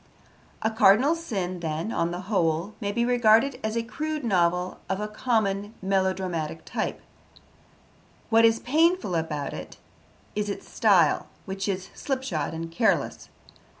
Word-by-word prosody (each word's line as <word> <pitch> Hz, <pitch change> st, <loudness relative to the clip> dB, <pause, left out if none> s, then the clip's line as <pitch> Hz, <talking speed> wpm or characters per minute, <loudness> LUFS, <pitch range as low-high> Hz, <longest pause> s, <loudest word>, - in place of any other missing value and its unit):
A 220 Hz, -, +2 dB
Cardinal 220 Hz, +6 st, +5 dB
Sin, 195 Hz, -, -3 dB
then, 165 Hz, +5 st, -3 dB
on 170 Hz, -, 0 dB
the 175 Hz, +1 st, -4 dB
whole, 180 Hz, -1 st, 0 dB
may 200 Hz, -1 st, -1 dB
be 235 Hz, +3 st, 0 dB
regarded 245 Hz, +2 st, +4 dB
as 220 Hz, +1 st, -1 dB
a 230 Hz, -, 0 dB
crude 305 Hz, +5 st, -4 dB
novel 180 Hz, -4 st, +1 dB
of 190 Hz, 0 st, -1 dB
a 210 Hz, -, -2 dB
common 210 Hz, -2 st, -1 dB
melodramatic 190 Hz, -4 st, -1 dB
type. -, -, -3 dB, 1.3 s
What 225 Hz, 0 st, +6 dB
is 225 Hz, 0 st, +5 dB
painful 325 Hz, -, +2 dB
about 155 Hz, -4 st, -2 dB
it -, -, -8 dB, 0.6 s
is 210 Hz, 0 st, -1 dB
its 200 Hz, -, -5 dB
style, 185 Hz, -9 st, +3 dB, 0.2 s
which 195 Hz, +1 st, -4 dB
is 190 Hz, -1 st, -3 dB
slipshod 260 Hz, -, -2 dB
and 165 Hz, +1 st, -5 dB
careless. 185 Hz, -, 0 dB
200 Hz, 140 wpm, -26 LUFS, 175-230 Hz, 1.3 s, What